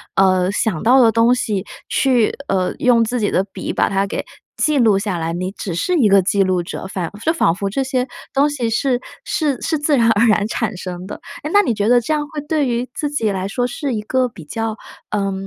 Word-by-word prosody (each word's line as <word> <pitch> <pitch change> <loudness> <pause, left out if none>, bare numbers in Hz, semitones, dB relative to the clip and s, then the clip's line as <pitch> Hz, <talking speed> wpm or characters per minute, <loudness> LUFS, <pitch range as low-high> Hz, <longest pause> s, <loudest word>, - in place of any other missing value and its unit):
呃， 185 -1 +3
想 200 -5 -1
到 255 +3 +5
的 230 -2 +5
东 230 +2 +4
西 210 -5 -2 0.2
去， 250 -5 +2
呃， 185 -2 0
用 240 -2 +4
自 240 +2 -1
己 205 - +1
的 185 - +1
笔 195 -1 -6
把 - - +1
它 195 0 0
给 - - -3 0.3
记 305 -1 +1
录 220 -6 +4
下 195 -2 -2
来， 165 0 -2
你 185 +2 -3
只 190 -3 -5
是 360 - 0
一 250 -8 +4
个 195 -1 +5
记 200 +2 +1
录 185 -2 0
者。 170 - -6
反 180 -3 -4
是 320 - +1
仿 235 - +2
佛 195 +2 -3
这 270 +7 -1
些 260 -1 -1 0.3
东 285 +2 +3
西 255 -6 -2
是 250 +2 0 0.2
是 290 -6 -1
是 325 -1 0
自 295 -1 +1
然 230 -1 +4
而 225 +1 +4
然 210 -1 +3
产 220 -3 -2
生 180 0 -6
的。 - - -6 0.3
诶， 300 - -3
那 410 - +7
你 240 - 0
觉 210 0 0
得 245 0 +6
这 240 +6 -2
样 300 -1 -1
会 310 -2 -5
对 305 -2 +1
于 240 +1 -1
自 295 - -2
己 255 -7 0
来 190 -2 -2
说 245 +4 -1
是 265 +2 -3
一 215 - -2
个 255 +4 0
比 165 -8 -12
较， 225 +6 -3 0.3
呃， 195 -2 -1
225 Hz, 255 characters per minute, -19 LUFS, 195-260 Hz, 0.3 s, 那